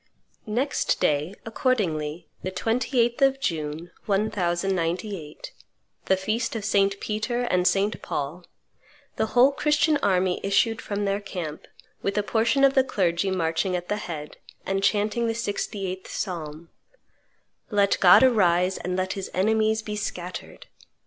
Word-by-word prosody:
Next 250 +7 0
day, 150 +5 +1
accordingly, 180 - -1
the 185 - -3
28th 235 +5 0
of 270 0 +4
June, 160 - -3 0.2
1098, 185 -4 -1 0.5
the 190 - +3
feast 220 +5 -2
of 215 -3 -3
St. 200 -1 +2
Peter 220 +3 -2
and 180 -6 +2
St. 200 +3 +1
Paul, 150 +6 -4 0.7
the 220 - +1
whole 260 +3 +7
Christian 300 +1 +2
army 185 -6 +1
issued 225 +3 +1
from 205 0 -3
their 200 0 0
camp, 175 -6 -6 0.3
with 200 +1 -2
a 210 - +2
portion 230 +6 +2
of 275 -1 +6
the 265 - +4
clergy 190 -6 0
marching 170 0 0
at 175 0 -4
their 210 - -1
head, 155 -7 -7 0.3
and 195 0 -1
chanting 215 +3 +1
the 225 - 0
68th 200 -4 -4
Psalm, 165 -3 -5 1.0
"Let 200 -2 +2
God 180 +6 +8
arise, 185 -7 +3
and 180 +1 -3
let 185 0 -1
His 195 -1 -5
enemies 220 +3 +2
be 210 -1 -4
scattered!" 180 -3 -6
200 Hz, 135 wpm, -25 LUFS, 180-220 Hz, 1.0 s, God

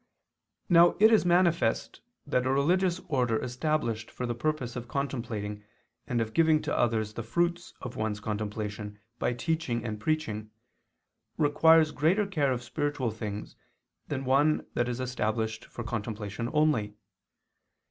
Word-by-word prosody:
Now 175 0 +6
it 220 +2 +7
is 215 - +4
manifest 170 -8 +2 0.2
that 125 0 0
a - - +2
religious 175 +6 +2
order 125 -7 +1
established 125 -3 -1
for 125 - -5
the 120 - -1
purpose 130 -1 -2
of 120 -1 -5
contemplating 115 -6 -3 0.4
and 120 - 0
of 110 -1 -2
giving 160 -2 +4
to - - -1
others 110 -3 +1
the 120 - -4
fruits 175 +8 -1
of 125 - -6
one's 110 -1 -2
contemplation 105 0 -4 0.2
by - - +1
teaching 125 -5 -2
and 105 -2 -4
preaching, 110 -6 -2 0.9
requires 160 +1 +5
greater 180 +9 +2
care 150 -9 0
of 125 -1 -2
spiritual 145 -2 -2
things 105 -1 -6 0.5
than 135 -2 -3
one 145 +4 +3
that 120 0 0
is 120 0 -3
established 110 -3 -2
for 120 - -7
contemplation 110 0 -4
only. 150 -10 +1
125 Hz, 140 wpm, -29 LUFS, 110-155 Hz, 0.9 s, it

